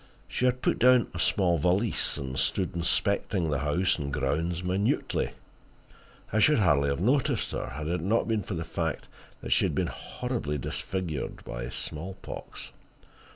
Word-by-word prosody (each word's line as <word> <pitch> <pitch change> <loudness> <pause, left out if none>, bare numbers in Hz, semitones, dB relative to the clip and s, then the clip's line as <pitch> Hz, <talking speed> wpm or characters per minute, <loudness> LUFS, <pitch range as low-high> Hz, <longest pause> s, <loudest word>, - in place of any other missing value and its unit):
She 125 - -1
had 125 0 +1
put - - +2
down 125 -2 +5
a 85 - -5
small 90 -3 +2
valise, 95 +8 +1
and 65 -2 -4
stood 95 +7 0
inspecting 85 0 +1
the 75 - +1
house 85 +6 +1
and 70 -1 -3
grounds 80 +7 -1
minutely. 95 +4 0 1.0
I 110 - +3
should 150 +7 +5
hardly 75 -9 +3
have 70 - -1
noticed 130 +8 +1
her, - - -3
had 75 +1 -4
it 85 +1 -1
not 105 +7 +1
been 110 -2 +1
for 100 - -5
the 80 - -2
fact 80 -1 -3 0.3
that - - -6
she - - +4
had - - 0
been - - 0
horribly 120 - -3
disfigured 80 +3 -4
by - - -5
smallpox. 85 +8 -6
90 Hz, 160 wpm, -28 LUFS, 75-105 Hz, 1.0 s, down